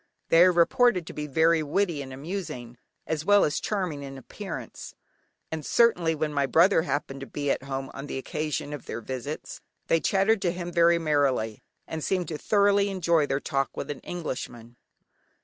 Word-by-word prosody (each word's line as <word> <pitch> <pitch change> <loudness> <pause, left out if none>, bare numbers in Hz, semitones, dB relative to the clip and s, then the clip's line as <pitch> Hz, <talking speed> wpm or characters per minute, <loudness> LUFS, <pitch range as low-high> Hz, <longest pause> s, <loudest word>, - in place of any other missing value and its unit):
They 165 - +6
are 185 - +6
reported 180 +2 +3
to - - -8
be 150 0 -4
very 160 +3 +3
witty 160 0 0
and 135 -1 -8
amusing, 130 -5 -6 0.3
as 155 -1 -2
well 205 +3 +5
as 150 - -1
charming 185 -9 -2
in 135 -1 -8
appearance, 135 - -8 0.6
and 160 -1 -4
certainly 175 -6 +3
when 155 0 -2
my 140 -1 +1
brother 170 +4 +5
happened 140 -3 -3
to 135 - -7
be 145 -1 -2
at - - -1
home 135 0 -5
on 140 +1 -7
the - - -4
occasion 150 +1 -3
of 145 - -8
their 115 - -5
visits, 130 +5 -6 0.2
they 165 - +3
chattered 195 +4 +2
to 175 - +1
him 175 0 -5
very 170 0 +4
merrily, 140 -9 0 0.2
and 160 -1 -5
seemed 180 -4 -1
to 155 -2 -4
thoroughly 200 -1 +3
enjoy 170 -5 +2
their 135 - 0
talk 135 -1 -2
with 145 - -3
an 145 - -6
Englishman. 125 -8 -6
155 Hz, 185 wpm, -27 LUFS, 135-175 Hz, 0.6 s, They